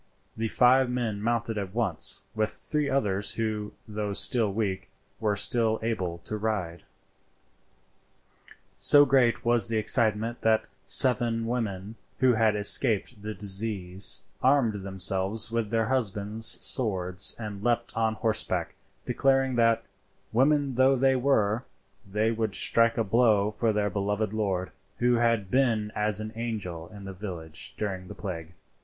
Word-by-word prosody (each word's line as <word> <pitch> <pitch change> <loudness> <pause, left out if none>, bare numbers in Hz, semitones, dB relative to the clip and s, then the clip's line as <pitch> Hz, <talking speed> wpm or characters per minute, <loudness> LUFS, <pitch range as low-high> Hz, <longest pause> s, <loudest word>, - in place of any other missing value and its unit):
The 115 +1 -3
five 125 +3 +3
men 115 -5 -3
mounted 115 -1 -2
at 100 0 -7
once, 100 -9 +1
with 110 0 -1
three 150 -2 -3
others 100 -7 -1
who, 110 -2 -4
though 105 -1 -4
still 110 0 +4
weak, 100 -2 -3 0.3
were 105 -2 -1
still 110 +1 +1
able 95 -7 -3
to 110 - -5
ride. 100 -6 -4 2.0
So 145 0 +7
great 125 -4 +1
was 120 -1 +2
the 115 -1 -2
excitement 110 +1 +1
that 110 -1 +1 0.2
seven 120 -3 +3
women, 110 -3 -4 0.2
who 130 -1 +3
had 110 -1 +1
escaped 105 +1 +3
the 105 +1 -6
disease, 95 -2 +1 0.2
armed 130 -4 +2
themselves 95 +2 0
with 115 -2 -2
their 115 0 0
husbands' 110 -3 +1
swords 90 -7 +4
and 105 -3 -7
leaped 120 +1 -2
on 110 -1 0
horseback, 110 0 -2 0.3
declaring 135 -1 +1
that, 115 -1 +2 0.5
women 140 +3 +1
though 130 +2 +3
they 135 +1 +2
were, 120 -4 0 0.5
they 110 +2 0
would 110 -3 -2
strike 115 0 +2
a 115 - +1
blow 105 -1 +2
for 115 +1 -1
their 105 -1 -1
beloved 105 +2 -2
lord, 95 -4 -2 0.3
who 120 0 +1
had 115 -5 0
been 115 -5 0
as 105 0 +1
an 110 +1 -7
angel 105 -8 -5
in 105 -2 -12
the 95 - -8
village 85 -5 -8
during 95 -3 -5
the - - -10
plague. 85 -4 -7
110 Hz, 140 wpm, -26 LUFS, 100-120 Hz, 2.0 s, So